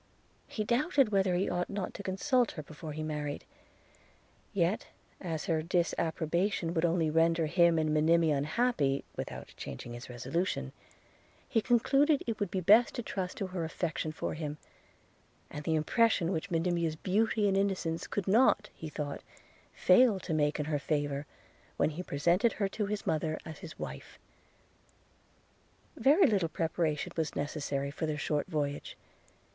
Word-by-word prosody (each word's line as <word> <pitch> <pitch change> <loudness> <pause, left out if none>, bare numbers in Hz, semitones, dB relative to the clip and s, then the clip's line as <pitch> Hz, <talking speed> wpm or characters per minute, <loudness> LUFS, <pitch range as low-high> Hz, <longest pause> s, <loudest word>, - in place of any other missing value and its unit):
– - - -36
He 215 - -3
doubted 270 - +2
whether 195 -3 +2
he 185 +2 +1
ought 175 0 -1
not 200 -2 -4
to - - -7
consult 235 +6 +1
her 155 - -6
before 155 +1 -8
he 155 +1 -4
married; 150 -2 -4 1.1
yet 190 +1 0 0.3
as 165 -4 -4
her 160 -2 +1
disapprobation 170 +1 0
would 165 0 +2
only 165 -2 +1
render 165 +1 +3
him 170 +1 +4
and 155 -1 +1
Monimia 160 0 +4
unhappy, 145 - +1
without - - -6
changing 120 - -7
his 120 +1 -9
resolution, 125 - -2 0.8
he 225 - +1
concluded 275 +6 +3
it 230 -2 -3
would 205 -3 -1
be 185 +1 -2
best 215 +7 +5
to 240 - -3
trust 185 -4 -4
to 195 - -2
her 185 -2 -4
affection 160 -1 -2
for 155 - -4
him, 150 -1 -5 0.9
and 150 0 -7
the 160 - +1
impression 180 +2 +2
which 180 +2 -3
Monimia's 170 -1 0
beauty 210 +5 +1
and 195 - +2
innocence 185 -4 -1
could 200 -3 -3
not 210 0 +4
he 160 - -7
thought 150 -2 -5 0.5
fail 210 +2 +5
to 165 - -3
make 150 -1 +1
in 150 - -1
her 150 -1 -1
favour, 145 -1 -2 0.5
when - - +2
he 160 +4 -5
presented 175 +8 +2
her 200 - 0
to 210 0 -2
his 210 0 -3
mother, 155 0 0
as 160 -1 -8
his 170 -4 -10
wife. - - -7 1.8
Very 310 +8 +5
little 200 - +2
preparation 160 0 -1
was 160 -2 -2
necessary 140 -1 -2
for 160 +2 -3
their 155 -1 -2
short 150 0 -1
voyage. 145 -2 -3
170 Hz, 160 wpm, -31 LUFS, 155-200 Hz, 1.8 s, best